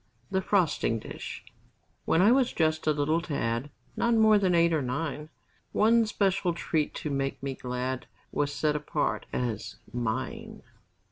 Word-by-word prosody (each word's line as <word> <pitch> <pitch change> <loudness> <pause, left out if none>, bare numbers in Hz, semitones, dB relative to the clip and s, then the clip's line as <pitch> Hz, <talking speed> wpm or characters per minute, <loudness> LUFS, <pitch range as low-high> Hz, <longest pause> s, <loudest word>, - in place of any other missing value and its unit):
THE 190 -1 +1
FROSTING 170 - +1
DISH 110 - -8 0.6
When 165 - +3
I 210 - +6
was 260 -1 +3
just 155 -1 +1
a - - +5
little 150 +3 +1
tad 125 -5 -2 0.3
Not 235 0 +2
more 220 -1 +6
than 185 -3 +2
eight 170 0 +4
or 155 - +2
nine, 150 +4 -3 0.4
One 225 +1 +4
special 195 -4 +1
treat 160 -2 -1
to 150 - -4
make 135 -1 -2
me 135 -1 -2
glad 125 0 -4 0.2
Was 145 -1 0
set 150 +1 0
apart 150 0 -1
as 115 -4 -3 0.2
"mine." 120 -3 -3
155 Hz, 150 wpm, -28 LUFS, 135-190 Hz, 0.6 s, I